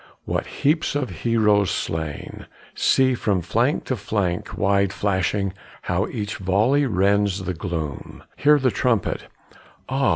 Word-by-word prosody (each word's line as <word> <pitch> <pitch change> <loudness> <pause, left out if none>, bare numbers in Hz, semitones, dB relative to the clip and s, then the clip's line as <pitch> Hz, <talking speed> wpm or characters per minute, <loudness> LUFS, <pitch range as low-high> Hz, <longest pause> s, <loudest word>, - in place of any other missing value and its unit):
what - - -2
heaps 155 +1 0
of 140 -8 -1
heroes 105 +1 +2
slain! 80 -3 -4 0.3
See, 130 -1 +3
from 105 -6 0
flank 120 - +1
to 130 - -2
flank 100 -5 -2
wide 100 0 +2
flashing, 100 -1 0 0.3
How - - 0
each 105 -1 -4
volley 110 +10 +2
rends 100 -1 +1
the 90 0 -2
gloom; 80 -4 -5
Hear 150 +1 +5
the 130 -3 +2
trumpet; 115 -4 0 0.6
ah! 135 0 +1
100 Hz, 130 wpm, -23 LUFS, 95-125 Hz, 0.6 s, Hear